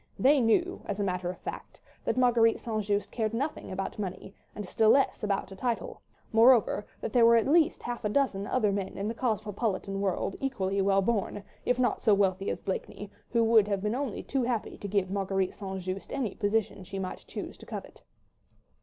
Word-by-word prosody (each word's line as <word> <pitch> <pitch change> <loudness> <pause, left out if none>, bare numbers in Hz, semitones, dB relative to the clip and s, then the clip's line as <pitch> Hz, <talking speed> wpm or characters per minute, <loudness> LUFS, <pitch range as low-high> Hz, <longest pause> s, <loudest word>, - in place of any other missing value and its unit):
They 280 +2 +5
knew, 350 +11 +2
as 205 0 -4
a - - +1
matter 180 -2 -1
of 180 - -5
fact, - - -8 0.3
that - - 0
Marguerite 235 -3 +4
St. 220 -2 -2
Just 205 0 -1
cared 225 -1 -1
nothing 280 -1 -3
about 195 +2 -4
money, 190 -1 -5 0.2
and 210 -2 -6
still 220 +3 +3
less 275 +4 +3
about 200 -1 -1
a - - -8
title; 235 +3 -3 0.3
moreover, 225 -2 +5
there 235 +2 +2
were 230 0 +7
at 230 - +3
least 315 +2 +3
half 240 0 -4
a 210 - 0
dozen 210 -5 0
other 220 -5 +2
men 195 -1 -3
in 200 - -2
the 225 - -2
cosmopolitan 210 -3 -2
world 195 0 -1
equally 200 -8 -1
well 195 0 +3
born, 205 -1 -1 0.2
if 250 - +2
not 255 -1 +1
so 215 -4 +5
wealthy 195 -1 +1
as - - -4
Blakeney, 200 +1 -4 0.2
who 235 -1 +2
would 225 -2 +5
have 200 -2 -1
been 210 +1 0
only 260 -3 -3
too 270 - -1
happy 240 -2 -2
to 200 - -5
give 195 -2 0
Marguerite 195 -1 0
St. 190 -2 -5
Just 185 +2 -5
any 245 -8 -2
position 205 -2 -1
she 195 +2 -7
might 190 -1 -5
choose - - -6
to - - -13
covet. - - -8
210 Hz, 200 wpm, -29 LUFS, 195-235 Hz, 0.3 s, were